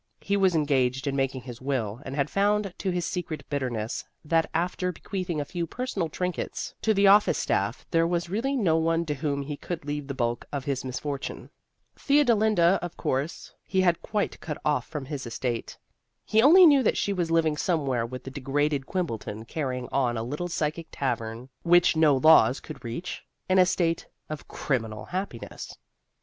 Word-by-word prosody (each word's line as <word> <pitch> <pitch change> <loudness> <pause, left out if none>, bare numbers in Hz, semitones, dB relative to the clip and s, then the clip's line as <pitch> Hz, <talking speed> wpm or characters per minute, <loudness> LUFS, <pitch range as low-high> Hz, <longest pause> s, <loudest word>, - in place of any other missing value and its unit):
He 200 - 0
was 190 -3 +3
engaged 135 -4 +1
in 140 -1 -1
making 135 -1 -1
his 120 -1 -9
will, 125 -4 -2
and 135 - -6
had 140 -1 +1
found 200 +1 +1
to 195 - -1
his 175 -2 -1
secret 175 -4 -4
bitterness 120 -6 -2 0.2
that 165 +1 +2
after 180 +2 -1
bequeathing 180 -2 -4
a 145 - -2
few 170 0 -3
personal 210 -7 -3
trinkets 180 +1 -3
to 220 - +2
the 200 +1 +4
office 205 +1 +6
staff 100 +5 -1
there 165 -1 +3
was 170 0 -1
really 230 +10 -1
no 180 -11 +2
one 165 +1 +1
to 150 - -1
whom 140 0 -2
he 145 +1 -5
could 165 +1 -6
leave 145 -1 -3
the 140 - -4
bulk 120 -2 -1
of 140 -2 -4
his 140 -3 -1
misfortune. 140 +2 -5 0.4
Theodolinda, 220 - +3
of 175 -1 -6
course, 140 +6 -2
he 190 -1 +1
had 175 -2 +2
quite 210 -2 -2
cut 150 -3 -5
off 145 -5 +1
from 150 -3 -5
his 135 -3 -5
estate. 120 0 -3 0.5
He 220 +1 +4
only 345 +8 +8
knew 285 -4 +7
that 245 - +2
she 200 - 0
was 175 -3 -1
living 165 -2 +2
somewhere 140 -8 0
with 125 +2 -6
the 135 - -7
degraded 140 +1 -1
Quimbleton, 115 - -3
carrying 125 -2 -3
on 125 -3 +1
a 115 - -2
little 150 +9 -3
psychic 165 -1 -2
tavern 115 -2 -3
which 175 0 +5
no 155 -3 +5
laws 135 -4 +6
could 155 - -10
reach, 120 +10 -5 0.2
in 185 0 +4
a 180 - +6
state 165 -2 0 0.2
of 155 -1 -6
criminal 110 -6 -2
happiness. 185 -10 -6
155 Hz, 185 wpm, -27 LUFS, 130-180 Hz, 0.5 s, only